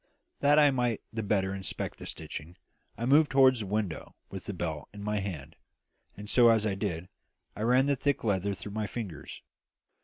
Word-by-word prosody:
That 145 Hz, +1 st, +4 dB
I 145 Hz, -2 st, +6 dB
might 125 Hz, -4 st, 0 dB
the 110 Hz, -, -2 dB
better 100 Hz, -2 st, 0 dB
inspect 95 Hz, -1 st, -4 dB
the -, -, -8 dB
stitching, 85 Hz, +5 st, -7 dB, 0.4 s
I 115 Hz, -, -2 dB
moved 145 Hz, +3 st, +5 dB
toward 130 Hz, -1 st, +5 dB
the 105 Hz, -3 st, -4 dB
window 100 Hz, -5 st, -3 dB, 0.2 s
with 95 Hz, -, -7 dB
the 105 Hz, -, -3 dB
belt 80 Hz, -4 st, -4 dB
in 105 Hz, -1 st, -9 dB
my 105 Hz, 0 st, -1 dB
hand; 80 Hz, -7 st, -6 dB, 0.6 s
and, 100 Hz, -, -8 dB
as 115 Hz, -3 st, +6 dB
I 105 Hz, -, +1 dB
did 95 Hz, -4 st, -3 dB
so, -, -, -24 dB, 0.5 s
I -, -, -5 dB
ran 125 Hz, +4 st, +4 dB
the 140 Hz, 0 st, +2 dB
thick 140 Hz, +1 st, 0 dB
leather 100 Hz, -2 st, 0 dB
through 100 Hz, +1 st, -7 dB
my 105 Hz, 0 st, -2 dB
fingers. 95 Hz, -, -7 dB
105 Hz, 190 wpm, -29 LUFS, 95-125 Hz, 0.6 s, I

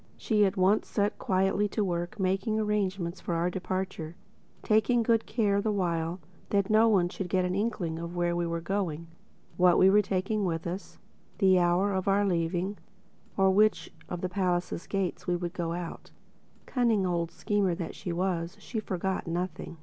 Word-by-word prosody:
She 210 Hz, -2 st, +2 dB
at 195 Hz, -, -4 dB
once 190 Hz, +3 st, +3 dB
set 205 Hz, 0 st, -1 dB
quietly 195 Hz, +2 st, +1 dB
to 210 Hz, +1 st, -1 dB
work 175 Hz, +4 st, -3 dB
making 195 Hz, +3 st, 0 dB
arrangements 195 Hz, -4 st, -1 dB
for 170 Hz, -, -2 dB
our 170 Hz, +2 st, 0 dB
departure—taking 190 Hz, +5 st, -2 dB
good 225 Hz, -1 st, +2 dB
care 205 Hz, -3 st, +1 dB
the 215 Hz, +1 st, 0 dB
while 170 Hz, -3 st, -1 dB, 0.3 s
that 200 Hz, +1 st, +1 dB
no 220 Hz, +1 st, +5 dB
one 190 Hz, -5 st, +3 dB
should 180 Hz, +1 st, -5 dB
get 185 Hz, 0 st, +2 dB
an 180 Hz, -, -1 dB
inkling 185 Hz, -6 st, -2 dB
of 170 Hz, +1 st, -6 dB
where 175 Hz, 0 st, 0 dB
we 175 Hz, 0 st, 0 dB
were 170 Hz, 0 st, -2 dB
going, 170 Hz, -3 st, -2 dB, 0.5 s
what 180 Hz, -1 st, +5 dB
we 190 Hz, +1 st, +6 dB
were 210 Hz, +1 st, +6 dB
taking 200 Hz, +2 st, -1 dB
with 165 Hz, -3 st, -2 dB
us, 180 Hz, +3 st, -6 dB, 0.4 s
the 190 Hz, -3 st, +5 dB
hour 180 Hz, +3 st, +2 dB
of 190 Hz, +1 st, -2 dB
our 200 Hz, +1 st, +3 dB
leaving 180 Hz, +2 st, -1 dB, 0.6 s
or 190 Hz, -1 st, +4 dB
which 215 Hz, +3 st, +2 dB, 0.2 s
of 175 Hz, -1 st, -4 dB
the 185 Hz, -, 0 dB
palace 180 Hz, -2 st, -1 dB
gates 195 Hz, -3 st, -2 dB
we 180 Hz, -, +2 dB
would 175 Hz, 0 st, -4 dB
go 170 Hz, -2 st, -2 dB
out 175 Hz, -1 st, -6 dB, 0.6 s
by. -, -, -18 dB
Cunning 230 Hz, -6 st, +2 dB
old 170 Hz, -2 st, 0 dB
schemer 200 Hz, -2 st, 0 dB
that 170 Hz, -, -5 dB
she 180 Hz, -, -5 dB
was, 175 Hz, 0 st, -2 dB
she 230 Hz, -, -4 dB
forgot 190 Hz, -2 st, -3 dB
nothing. 175 Hz, 0 st, -4 dB
185 Hz, 180 wpm, -29 LUFS, 175-205 Hz, 0.6 s, we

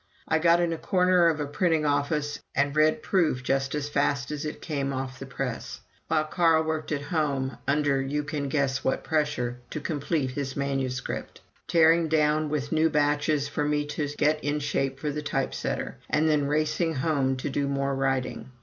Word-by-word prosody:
I 160 Hz, -, +2 dB
got 170 Hz, +1 st, +5 dB
in 170 Hz, -1 st, +1 dB
a 160 Hz, -, -5 dB
corner 180 Hz, -2 st, +3 dB
of 160 Hz, -2 st, +1 dB
a 150 Hz, -, -1 dB
printing 160 Hz, +1 st, +1 dB
office 145 Hz, +1 st, 0 dB, 0.2 s
and 140 Hz, +1 st, +1 dB
read 155 Hz, +9 st, +3 dB
proof 160 Hz, -9 st, +1 dB
just 135 Hz, +2 st, 0 dB
as 145 Hz, -1 st, -2 dB
fast 140 Hz, -2 st, 0 dB
as 150 Hz, 0 st, -4 dB
it 150 Hz, -, -5 dB
came 140 Hz, -4 st, -2 dB
off 130 Hz, 0 st, -4 dB
the 135 Hz, -, -7 dB
press, 130 Hz, -2 st, -5 dB, 0.3 s
while 155 Hz, -, +2 dB
Carl 160 Hz, 0 st, +3 dB
worked 160 Hz, -1 st, -3 dB
at 145 Hz, -2 st, -1 dB
home, 140 Hz, -5 st, -1 dB
under 140 Hz, -1 st, +2 dB
you 145 Hz, +2 st, -2 dB
can 145 Hz, -1 st, -3 dB
guess 140 Hz, -1 st, 0 dB
what 130 Hz, -, 0 dB
pressure, 145 Hz, -6 st, -1 dB
to -, -, -4 dB
complete 145 Hz, -2 st, -1 dB
his 135 Hz, 0 st, -4 dB
manuscript 135 Hz, -2 st, -3 dB, 0.3 s
tearing 165 Hz, 0 st, +5 dB
down 155 Hz, -1 st, +2 dB
with 145 Hz, -1 st, -2 dB
new 160 Hz, 0 st, +3 dB
batches 150 Hz, -1 st, +1 dB
for 150 Hz, -, -2 dB
me 150 Hz, 0 st, 0 dB
to 150 Hz, -, -1 dB
get 150 Hz, +1 st, +2 dB
in 145 Hz, +1 st, 0 dB
shape 135 Hz, -2 st, -1 dB
for 150 Hz, -, -2 dB
the 150 Hz, +1 st, -3 dB
type 135 Hz, -2 st, -1 dB
setter, -, -, -3 dB
and 155 Hz, +2 st, +2 dB
then 150 Hz, -2 st, +2 dB
racing 155 Hz, +2 st, 0 dB
home 135 Hz, -2 st, +1 dB
to 130 Hz, -, -3 dB
do 140 Hz, +1 st, 0 dB
more 140 Hz, 0 st, 0 dB
writing. 135 Hz, -1 st, -1 dB
145 Hz, 190 wpm, -27 LUFS, 135-155 Hz, 0.3 s, got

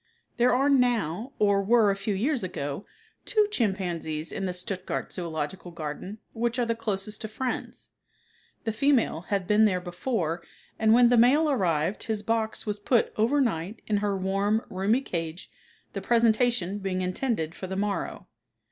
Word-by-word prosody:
There 245 Hz, +1 st, +4 dB
are 270 Hz, +3 st, +3 dB
now, 245 Hz, -, +2 dB
or 200 Hz, -1 st, +3 dB
were 215 Hz, 0 st, +4 dB
a -, -, 0 dB
few 195 Hz, +1 st, -2 dB
years 255 Hz, +5 st, 0 dB
ago, 145 Hz, -1 st, -4 dB, 0.4 s
two 425 Hz, -3 st, +2 dB
chimpanzees 175 Hz, -, -1 dB
in 195 Hz, -, -3 dB
the 185 Hz, -, -1 dB
Stuttgart 180 Hz, +1 st, -4 dB
zoological 170 Hz, +1 st, -4 dB
garden, 170 Hz, +5 st, -6 dB, 0.2 s
which 235 Hz, +1 st, -1 dB
are 245 Hz, -, +2 dB
the 230 Hz, -, +1 dB
closest 210 Hz, -2 st, -4 dB
of 220 Hz, -, -4 dB
friends. 255 Hz, +3 st, -4 dB, 0.7 s
The 225 Hz, -, -1 dB
female 255 Hz, -, +2 dB
had 195 Hz, -2 st, 0 dB
been 210 Hz, +3 st, +5 dB
there 185 Hz, -4 st, +2 dB
before 175 Hz, -2 st, -2 dB, 0.4 s
and 220 Hz, 0 st, +4 dB
when 240 Hz, +1 st, +7 dB
the 245 Hz, -, +4 dB
male 290 Hz, +7 st, +5 dB
arrived 180 Hz, -, 0 dB
his 215 Hz, -2 st, -2 dB
box 225 Hz, 0 st, -1 dB
was 210 Hz, -1 st, -2 dB
put 230 Hz, +3 st, +2 dB
over 235 Hz, +7 st, +2 dB
night 210 Hz, -4 st, -1 dB
in 210 Hz, -, +1 dB
her 200 Hz, -1 st, 0 dB
warm, 195 Hz, +3 st, 0 dB
roomy 200 Hz, +7 st, +1 dB
cage 165 Hz, -7 st, -5 dB, 0.4 s
the 195 Hz, -, -4 dB
presentation 230 Hz, -3 st, +2 dB
being 190 Hz, -2 st, -2 dB
intended 180 Hz, -3 st, -1 dB
for 185 Hz, -, -7 dB
the 190 Hz, -, -4 dB
morrow. 205 Hz, 0 st, -2 dB
205 Hz, 165 wpm, -27 LUFS, 185-235 Hz, 0.7 s, when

